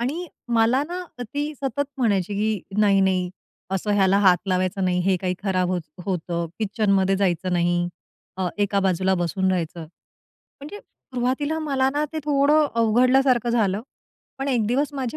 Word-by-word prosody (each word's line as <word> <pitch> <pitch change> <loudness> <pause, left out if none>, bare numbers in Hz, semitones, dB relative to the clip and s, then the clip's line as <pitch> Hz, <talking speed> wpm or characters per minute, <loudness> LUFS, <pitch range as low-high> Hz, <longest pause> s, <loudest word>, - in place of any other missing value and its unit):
आणि 300 +9 -2 0.3
मला 230 +4 +3
ना 360 +1 -4 0.2
ती 290 +6 -3
सतत 280 +1 -1
म्हणायची, 205 -5 +1
की 205 -2 -2
"नाही, 200 -2 +4
नाही, 185 -2 +1 0.4
असं 195 +2 -2
ह्याला 195 0 +4
हात 185 -3 +5
लावायचं 185 +1 0
नाही, 180 0 +1
हे 190 0 +2
काही 185 -1 -1
खराब 185 -2 0
होत 180 -1 0 0.3
होतं, 170 -2 -2
किचनमध्ये 195 -3 +1
जायचं 185 -1 0
नाही, 175 0 +1 0.5
अ, 185 -1 -1
एका 200 0 +1
बाजूला 190 0 +1
बसून 185 +2 0
राहायचं." 170 -2 -2 0.6
म्हणजे 300 +9 -12
सुरुवातीला 265 - -3
मला 270 -4 +1
ना 295 +2 0
ते 315 - -3
थोडं 295 +1 +3
अवघडल्यासारखं 245 +2 +3
झालं, 210 -4 +1 0.6
पण 270 +1 -2
एक 240 -5 +1
दिवस 280 +6 0
माझी 265 0 -3
205 Hz, 155 wpm, -23 LUFS, 185-265 Hz, 0.6 s, हात